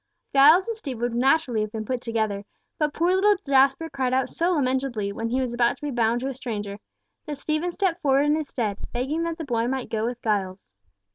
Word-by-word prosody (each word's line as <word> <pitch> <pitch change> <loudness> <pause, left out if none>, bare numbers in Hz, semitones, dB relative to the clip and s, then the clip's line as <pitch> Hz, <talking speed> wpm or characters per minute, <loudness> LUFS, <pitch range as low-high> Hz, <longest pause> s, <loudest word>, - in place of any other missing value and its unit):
Giles 305 +8 +6
and 460 - -2
Stephen 270 - -7
would 240 -1 0
naturally 255 -1 +2
have 215 0 -3
been 220 -1 -5
put 250 +2 -2
together, 220 -4 -2 0.4
but 300 -1 +1
poor 345 +4 +1
little 410 +2 +4
Jasper 275 +3 +3
cried 260 -4 -1
out 260 -1 0
so 345 +2 +1
lamentably, 260 - 0
when 225 +3 -3
he 255 +3 0
was 255 -2 -2
about 240 0 +2
to - - -27
be 295 - -2
bound 235 -1 +1
to 265 - -2
a 270 - -3
stranger, 210 -6 -5 0.5
that 295 -1 -4
Stephen 310 +5 -1
stepped 365 -2 -1
forward 275 0 +3
in 295 +1 +3
his 310 -2 -3
stead, 215 -7 -3
begging 265 +7 -2
that 335 -1 -3
the 325 - -5
boy 235 -3 0
might 260 0 -3
go 220 -1 -1
with 245 0 -4
Giles. 190 - -2
260 Hz, 225 wpm, -25 LUFS, 230-300 Hz, 0.5 s, Giles